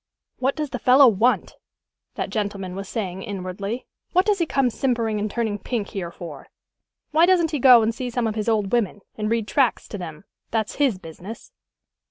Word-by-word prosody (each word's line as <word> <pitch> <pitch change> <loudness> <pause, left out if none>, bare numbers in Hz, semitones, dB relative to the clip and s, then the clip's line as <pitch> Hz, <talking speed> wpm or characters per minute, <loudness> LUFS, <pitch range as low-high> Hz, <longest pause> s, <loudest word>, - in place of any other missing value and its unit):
"What 265 +2 +1
does 300 -4 -3
the 250 - -3
fellow 260 +3 +7
want?" 230 +3 +2 0.6
that - - -3
gentleman 200 -4 -3
was 195 0 -6
saying 190 -5 -3
inwardly. 195 +4 -5 0.3
"What 365 +2 +4
does 415 -2 +2
he 335 - +1
come 270 -4 +2
simpering 230 -4 0
and 210 +1 -1
turning 220 -2 -2
pink 215 0 -3
here 190 -5 -4
for? 165 -5 -9 0.6
Why 320 +3 +5
doesn't 345 -3 +3
he 300 - -1
go 245 -3 +8
and 225 +1 +1
see 250 +2 -4
some 240 0 -1
of 220 - 0
his 215 +1 -1
old 210 -3 +1
women, 210 -4 0
and 215 -1 -2
read 225 -2 0
tracts 265 -3 +1
to 205 - -6
them? 160 -2 -8 0.3
That's 220 -2 -2
his 270 -8 +2
business." 185 +5 -10
225 Hz, 195 wpm, -23 LUFS, 200-255 Hz, 0.6 s, go